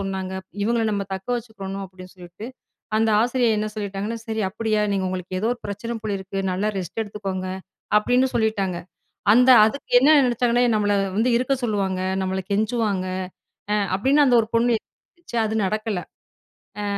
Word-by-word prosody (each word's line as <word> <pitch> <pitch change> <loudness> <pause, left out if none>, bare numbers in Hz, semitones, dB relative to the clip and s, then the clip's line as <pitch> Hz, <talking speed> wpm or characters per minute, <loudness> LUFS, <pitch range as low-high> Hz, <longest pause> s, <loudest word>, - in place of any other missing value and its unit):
சொன்னாங்க. 190 -1 -4 0.3
இவுங்கள்ல 225 -1 +1
நம்ம 200 -1 -1
தக்க 190 +4 -8
வச்சுக்கணும் 195 -4 -6
அப்படின்னு 185 0 -13
சொல்லிட்டு, 180 +5 -10 0.5
அந்த 220 0 +2
ஆசிரியர் 240 -1 +2
என்ன 215 0 -1
சொல்லிட்டாங்கன்னா 205 +2 -4
"சரி 220 -1 -2
அப்படியா 215 +1 -1
நீங்க 190 -1 0
உங்களுக்கு 185 0 -4
ஏதோ 220 - 0
ஒரு 245 - -7
பிரச்சன 230 +4 -4
போலிருக்கு, 195 -2 -4
நல்லா 195 +4 0
ரெஸ்ட் 185 +3 -4
எடுத்துக்கோங்க, 195 -3 -5 0.5
அப்படின்னு 245 +4 +2
சொல்லிட்டாங்க. 200 -6 0 0.6
அந்த 250 +2 +5 0.2
அதுக்கு 270 +6 -4
என்ன 280 +4 +4
நெனச்சாங்கன்னா 245 -1 +2
நம்மள 205 -1 +2 0.2
வந்து 240 +3 +3
இருக்க 255 +2 0
சொல்லுவாங்க. 195 -5 0 0.2
நம்மல 190 0 -2
கெஞ்சுவாங்க. 210 -3 0 0.7
அ - - +3 0.2
அப்படின்னு 275 +8 +3
அந்த 250 -3 +4
ஒரு 220 - -5
பொண்ணு 240 +1 +3
யோசிச்சு 345 -9 -11
அது 220 - -2
நடக்கல, 215 -1 -2 0.8
அ - - -3
215 Hz, 150 wpm, -23 LUFS, 190-235 Hz, 0.8 s, அந்த